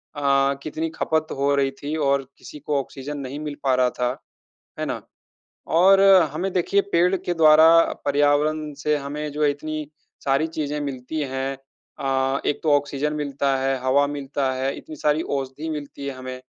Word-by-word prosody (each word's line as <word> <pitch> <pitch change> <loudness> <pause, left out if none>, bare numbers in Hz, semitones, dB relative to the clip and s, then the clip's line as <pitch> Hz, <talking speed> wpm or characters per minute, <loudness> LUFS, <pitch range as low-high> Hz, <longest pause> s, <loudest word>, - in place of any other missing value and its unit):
अ, 140 -1 +2
कितनी 160 +1 -3
खपत 160 0 0
हो 140 +1 +2
रही 135 -1 +1
थी 150 +2 -2
और 140 0 +2
किसी 150 - -11
को 145 0 -1
ऑक्सीज़न 140 +2 -6
नहीं 135 +2 -6
मिल 150 -1 -5
पा 130 -2 +3
रहा 125 -1 +3
था। 125 0 +2 0.7
है - - -1
ना? - - -4 0.7
और 190 +4 +5 0.3
हमें 185 +4 -2
देखिए 195 +2 +2
पेड़ 180 +3 +3
के 175 -1 -2
द्वारा 160 0 +7 0.4
पर्यावरण 145 +1 +1
से 150 0 +2
हमें 145 +1 -5
जो 150 +1 -2
है 145 - +4
इतनी 155 +1 -5 0.4
सारी 140 +4 +2
चीज़ें 150 -2 -3
मिलती 140 +2 -4
हैं 135 0 -2 0.4
अ, 135 0 0
एक 145 - 0
तो 155 - +2
ऑक्सीज़न 145 +1 -2
मिलता 140 -2 -1
है, 135 0 0
हवा 135 +2 +3
मिलता 140 -2 -2
है, 130 +1 -2
इतनी 155 - -10
सारी 150 +2 +1 0.2
औषधि 135 +4 -5
मिलती 145 -2 -6
है 140 - -3
हमें। 130 0 -7
145 Hz, 175 wpm, -23 LUFS, 135-155 Hz, 0.7 s, द्वारा